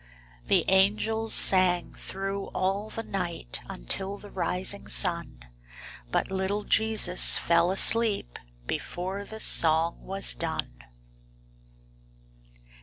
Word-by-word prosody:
The - - +1
angels 215 +4 0
sang 185 -2 +4
thro' 195 +1 -6
all 195 +3 -2
the 225 - -7
night 175 - -4
Until 190 - -3
the 205 0 -14
rising 190 +2 -2
sun, 170 - -1 0.7
But - - -2
little 190 +2 -3
Jesus 220 -5 +2
fell 170 +1 +1
asleep 205 - +4 0.3
Before 185 - -5
the 220 +2 -10
song 165 -3 +3
was 195 +1 -1
done. - - -5
190 Hz, 100 wpm, -26 LUFS, 175-205 Hz, 0.7 s, sang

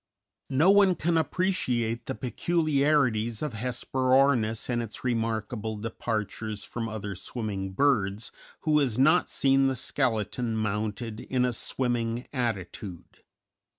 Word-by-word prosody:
No 150 +8 +5
one 200 -2 +5
can 165 +1 0
appreciate 130 -9 0
the - - -3
peculiarities 140 -4 +1
of 150 -5 -3
Hesperornis 125 0 +1
and 120 -1 0
its 115 -2 -7
remarkable 110 -2 -2
departures 110 -1 -3
from 115 +2 -4
other 105 -2 -5
swimming 95 -1 -4
birds 105 -5 +1 0.3
who 155 -2 +3
has 125 -6 0
not 155 +7 +4
seen 135 0 +3
the 135 - 0
skeleton 120 -3 -1
mounted 110 +1 -2
in 125 0 0
a 125 - 0
swimming 120 -1 -1
attitude. 100 - -4
120 Hz, 120 wpm, -27 LUFS, 110-135 Hz, 0.3 s, No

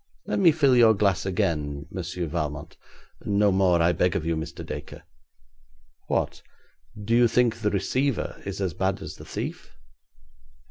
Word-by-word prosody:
Let - - -1
me 175 -4 +6
fill 140 -4 +3
your 115 -2 +6
glass 100 -2 +1
again, 75 -5 -1
Monsieur 90 -1 -4
Valmont.' 75 -2 -4 0.5
'No 100 0 +2
more, 90 -3 +3
I 85 - +4
beg 90 +2 +1
of 85 -5 -2
you, 85 0 0
Mr. 80 - -6
Dacre.' - - -8 1.0
'What, - - -1 0.6
do 110 +3 0
you 120 0 +6
think 120 0 +2
the 110 -3 0
receiver 125 +7 -1
is 100 -1 -5
as 95 -4 -1
bad 95 +3 -1
as - - -8
the - - -11
thief?' 65 - -6
95 Hz, 155 wpm, -25 LUFS, 85-115 Hz, 1.0 s, me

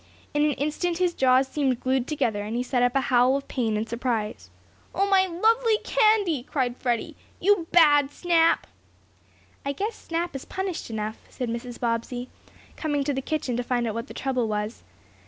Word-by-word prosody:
In 295 0 +2
an 300 -1 +3
instant 305 +5 -1
his 360 -1 +1
jaws 260 -1 +4
seemed 265 -3 0
glued 260 0 0
together, 225 -9 0
and 210 +3 -4
he 245 - 0
set 250 -1 0
up 245 +1 +2
a 270 - +4
howl 255 +1 +3
of 280 - -8
pain 225 -4 -1
and 220 +1 -2
surprise. 220 - -3 0.5
"Oh, 395 +1 +2
my 380 -1 +4
lovely 445 +6 +2
candy!" 425 - +3
cried 250 -2 -2
Freddie. 240 -2 -2 0.2
"You 390 -3 +2
bad 290 -5 +6
Snap!" 330 +1 +2 1.0
"I 280 - -2
guess 415 +9 -2
Snap 335 -1 -4
is 270 - -5
punished 380 -7 -4
enough," 220 0 -4
said 250 -2 -4
Mrs. 235 +1 -5
Bobbsey, 240 +1 -2 0.5
coming 295 -3 -1
to 285 +1 -1
the 270 - -2
kitchen 270 -4 -2
to 245 - -1
find 240 -1 0
out 220 - -2
what 230 +3 -4
the - - -11
trouble 255 -3 -1
was. 210 +1 -3
265 Hz, 185 wpm, -25 LUFS, 240-330 Hz, 1.0 s, bad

